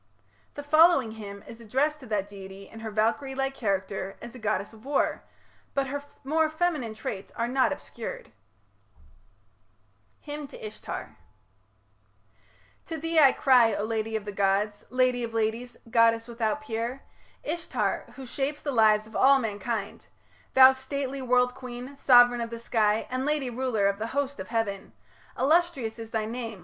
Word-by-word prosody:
The 290 Hz, -, -6 dB
following 310 Hz, -5 st, +5 dB
hymn 200 Hz, -2 st, -9 dB
is 230 Hz, 0 st, -11 dB
addressed 275 Hz, +7 st, 0 dB
to 260 Hz, -, -12 dB
that 205 Hz, -2 st, -1 dB
deity 195 Hz, -1 st, -10 dB
in 225 Hz, -, -12 dB
her 220 Hz, 0 st, -5 dB
Valkyrie 230 Hz, +6 st, 0 dB
like 270 Hz, 0 st, -1 dB
character 195 Hz, -4 st, -2 dB
as 235 Hz, -, -9 dB
a 255 Hz, -, -10 dB
goddess 215 Hz, -1 st, -2 dB
of 220 Hz, 0 st, -16 dB
war, 275 Hz, +1 st, 0 dB, 0.5 s
but 275 Hz, -1 st, +2 dB
her 285 Hz, +1 st, -3 dB, 0.2 s
more 310 Hz, +3 st, +2 dB
feminine 315 Hz, -9 st, -1 dB
traits 200 Hz, -2 st, -6 dB
are 235 Hz, -, -1 dB
not 260 Hz, +3 st, +2 dB
obscured: 235 Hz, -, -7 dB, 1.9 s
HYMN 295 Hz, -1 st, -5 dB
TO 465 Hz, -, -10 dB
ISHTAR 430 Hz, -, -7 dB, 1.7 s
To 325 Hz, -, -4 dB
thee 330 Hz, +1 st, +1 dB
I 275 Hz, -3 st, +8 dB
cry, 240 Hz, -5 st, +4 dB
O -, -, -2 dB
lady 220 Hz, 0 st, -2 dB
of 215 Hz, -2 st, -3 dB
the 205 Hz, -, -4 dB
gods, 200 Hz, +1 st, 0 dB
Lady 255 Hz, -1 st, +2 dB
of 230 Hz, -1 st, -5 dB
ladies, 225 Hz, +2 st, -1 dB
goddess 230 Hz, 0 st, +3 dB
without 235 Hz, +3 st, -1 dB
peer, 235 Hz, +1 st, -4 dB, 0.4 s
Ishtar 260 Hz, -, -2 dB
who 265 Hz, 0 st, -8 dB
shapes 275 Hz, +4 st, -3 dB
the 285 Hz, -, -1 dB
lives 215 Hz, -3 st, +4 dB
of 220 Hz, -, -14 dB
all 275 Hz, +1 st, +6 dB
mankind, 220 Hz, -2 st, -4 dB, 0.5 s
Thou 260 Hz, 0 st, +10 dB
stately 270 Hz, +1 st, -4 dB
world 250 Hz, 0 st, +3 dB
queen, 250 Hz, +1 st, -8 dB
sovran 245 Hz, -3 st, +6 dB
of 230 Hz, -, -5 dB
the 230 Hz, -, -6 dB
sky, 220 Hz, -2 st, +1 dB
And 255 Hz, +1 st, -1 dB
lady 290 Hz, -3 st, 0 dB
ruler 240 Hz, -4 st, 0 dB
of 200 Hz, 0 st, -1 dB
the 220 Hz, -, -2 dB
host 280 Hz, -4 st, -1 dB
of 190 Hz, -, -6 dB
heaven 215 Hz, -4 st, -2 dB, 0.4 s
Illustrious 275 Hz, -5 st, +1 dB
is 225 Hz, -1 st, -7 dB
thy 220 Hz, -1 st, -1 dB
name... 225 Hz, -2 st, -5 dB
240 Hz, 160 wpm, -27 LUFS, 220-270 Hz, 1.9 s, Thou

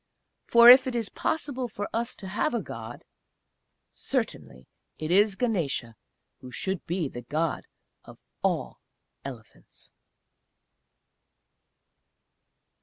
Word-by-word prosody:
For 235 Hz, 0 st, +7 dB
if 260 Hz, +1 st, +7 dB
it 255 Hz, -, -3 dB
is 230 Hz, -3 st, -1 dB
possible 280 Hz, -5 st, -2 dB
for 205 Hz, -2 st, -5 dB
us 235 Hz, +1 st, -2 dB
to 190 Hz, -, -7 dB
have 225 Hz, +8 st, -1 dB
a 235 Hz, -, 0 dB
God 115 Hz, -1 st, -9 dB, 0.9 s
certainly 65 Hz, 0 st, -3 dB, 0.3 s
it 155 Hz, +1 st, -4 dB
is 205 Hz, +2 st, +4 dB
Ganesa 165 Hz, -, -1 dB, 0.5 s
who 130 Hz, -, -11 dB
should 190 Hz, +7 st, -3 dB
be 170 Hz, -2 st, -1 dB
the 120 Hz, -2 st, -8 dB
God 155 Hz, +6 st, -2 dB, 0.4 s
of -, -, -14 dB, 0.2 s
all -, -, -1 dB, 0.4 s
Elephants.... 120 Hz, -5 st, -11 dB
190 Hz, 110 wpm, -27 LUFS, -, 0.9 s, For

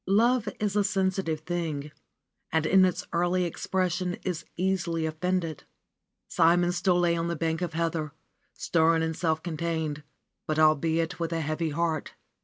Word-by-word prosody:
Love 225 Hz, +3 st, +3 dB
is 210 Hz, -1 st, -1 dB
a 205 Hz, -, +3 dB
sensitive 190 Hz, -5 st, 0 dB
thing 155 Hz, -3 st, -3 dB, 0.6 s
and 160 Hz, -1 st, +1 dB
in 190 Hz, +3 st, +5 dB
its 180 Hz, -, -1 dB
early 175 Hz, +2 st, +2 dB
expression 180 Hz, +1 st, -1 dB
is 180 Hz, -4 st, -3 dB
easily 175 Hz, -3 st, 0 dB
offended. 165 Hz, 0 st, -2 dB, 0.6 s
Simon 175 Hz, +1 st, +3 dB
still 180 Hz, 0 st, +2 dB
lay 170 Hz, -1 st, +3 dB
on 165 Hz, 0 st, -1 dB
the 170 Hz, -, -1 dB
bank 160 Hz, +1 st, -1 dB
of 175 Hz, -2 st, -2 dB
heather, 165 Hz, -2 st, -1 dB, 0.4 s
stern 165 Hz, 0 st, +2 dB
and 160 Hz, 0 st, -2 dB
self 160 Hz, -1 st, 0 dB
contained, 160 Hz, -2 st, -2 dB, 0.5 s
but 155 Hz, -, -1 dB
albeit 160 Hz, +2 st, +2 dB
with 165 Hz, -1 st, -2 dB
a 165 Hz, -1 st, -1 dB
heavy 155 Hz, +2 st, -1 dB
heart. 160 Hz, 0 st, -2 dB
170 Hz, 150 wpm, -27 LUFS, 160-180 Hz, 0.6 s, in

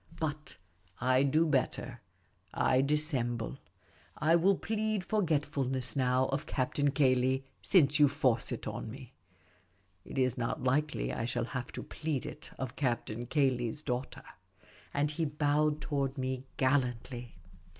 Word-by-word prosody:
But 150 Hz, -1 st, -4 dB, 0.4 s
I 130 Hz, +1 st, +3 dB
do 150 Hz, +4 st, +3 dB
better; 130 Hz, -4 st, -1 dB, 0.5 s
I 130 Hz, 0 st, +3 dB
dissemble. 135 Hz, -5 st, 0 dB, 0.6 s
I 160 Hz, +3 st, +4 dB
will 185 Hz, +3 st, +4 dB
plead 215 Hz, -2 st, -1 dB
forgetfuluess 145 Hz, -, 0 dB
now 130 Hz, -1 st, +3 dB
of 135 Hz, +1 st, -2 dB
Captain 145 Hz, +2 st, 0 dB
Cayley, 130 Hz, -1 st, +2 dB, 0.2 s
since 150 Hz, -6 st, +4 dB
you 145 Hz, -, +8 dB
force 130 Hz, -5 st, +1 dB
it -, -, -4 dB
on -, -, -4 dB
me. 130 Hz, +2 st, -10 dB, 0.9 s
It -, -, -9 dB
is 130 Hz, -2 st, +1 dB
not 115 Hz, +1 st, -2 dB
likely 130 Hz, -, 0 dB
I 115 Hz, -, -2 dB
shall 120 Hz, 0 st, -1 dB
have 125 Hz, 0 st, -5 dB
to -, -, -5 dB
plead 155 Hz, -4 st, -3 dB
it -, -, -8 dB
of 130 Hz, -2 st, -4 dB
Captain 120 Hz, -3 st, -2 dB
Cayley's 130 Hz, -1 st, +1 dB
daughter." 125 Hz, 0 st, -3 dB, 0.7 s
And 145 Hz, +1 st, 0 dB
he 165 Hz, +2 st, -2 dB
bowed 150 Hz, 0 st, +1 dB
toward 140 Hz, -2 st, -1 dB
me 130 Hz, 0 st, -2 dB
gallantly. 125 Hz, -2 st, 0 dB
135 Hz, 135 wpm, -32 LUFS, 125-150 Hz, 0.9 s, you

